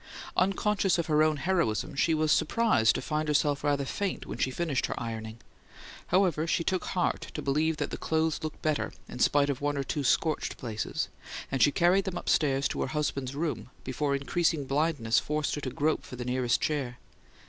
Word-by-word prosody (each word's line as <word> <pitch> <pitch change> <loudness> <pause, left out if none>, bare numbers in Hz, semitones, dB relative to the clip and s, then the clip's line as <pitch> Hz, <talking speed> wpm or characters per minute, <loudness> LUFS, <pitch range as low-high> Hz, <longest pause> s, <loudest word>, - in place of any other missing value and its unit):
Unconscious 195 0 +2
of 170 - 0
her 155 -1 +3
own 155 -1 +3
heroism, 150 - 0
she 160 +3 +2
was 155 0 +1
surprised 220 - +3
to - - -3
find 155 0 -1
herself 145 -1 +1
rather 145 -1 +1
faint 200 +7 -3
when - - -7
she - - +2
finished 140 0 -1
her - - -4
ironing. 110 -1 -5 0.7
However, 175 -4 +2
she 170 - +1
took 185 +2 -1
heart 180 -2 -1
to - - -3
believe 155 +3 +1
that - - -3
the - - -5
clothes 160 0 0
looked 155 -1 -6
better, 155 -2 0
in - - -8
spite 145 0 +3
of 135 - -5
one 145 0 0
or 140 - 0
two 145 +2 -2
scorched 155 +5 +1
places; 110 -3 -3 0.4
and 135 - 0
she 145 - +6
carried 180 +5 +3
them 185 -2 -3
upstairs 140 -5 +2
to - - -3
her - - 0
husband's 140 -3 -2
room 140 -8 -3
before 140 +2 -1
increasing 150 +1 0
blindness 140 -5 +1
forced 150 0 -1
her 145 - -3
to 135 - -3
grope 150 +5 0
for - - -9
the 120 -1 -5
nearest 125 -1 +1
chair. 135 -5 -2
150 Hz, 195 wpm, -29 LUFS, 135-160 Hz, 0.7 s, she